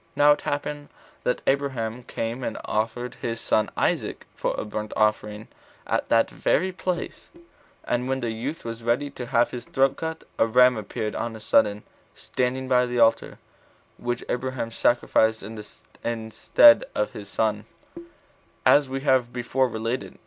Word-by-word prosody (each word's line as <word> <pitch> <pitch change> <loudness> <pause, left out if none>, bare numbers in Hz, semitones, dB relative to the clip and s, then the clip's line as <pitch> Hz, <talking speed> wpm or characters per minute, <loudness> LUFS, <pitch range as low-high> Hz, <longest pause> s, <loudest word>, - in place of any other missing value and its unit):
Now 145 0 +6
it 145 - +2
happened 145 0 -4 0.3
that 125 - -1
Abraham 130 -4 -1
24came 120 +1 -4
and - - -3
offered 115 +3 -2
his 115 -1 -3
son 110 - +1
Isaac - - -1
for - - -2
a - - -3
burnt 105 0 -5
offering 105 0 0 0.4
at - - -1
that 115 0 +4
very 185 +4 0
place; 180 -1 -4 0.5
and 125 +1 -1
when 135 0 0
the 120 -3 -2
youth 125 +8 -5
was 115 0 -5
ready 125 +5 0
to 125 -3 -7
have 120 -2 +2
his 120 -1 -6
throat 135 0 +1
cut, 160 0 -5 0.2
a 115 - +4
ram 125 +2 +5
appeared 110 0 -4
on 115 -1 -3
a - - -9
sudden, 105 0 +2 0.3
standing 130 +1 -2
by 125 -1 +3
the 125 0 -3
altar, 115 -1 +3 0.6
which 120 0 -3
Abraham 125 -2 -3
sacrificed 110 -2 +2
in 105 +3 -7
the 110 +1 -7
stead 295 - +6
of - - 0
his - - -9
son, - - -1 1.0
as 145 -2 +5
we 135 0 -3
have 130 -4 +2
before 125 +1 0
related. 115 +2 -4
120 Hz, 160 wpm, -25 LUFS, 115-130 Hz, 1.0 s, Now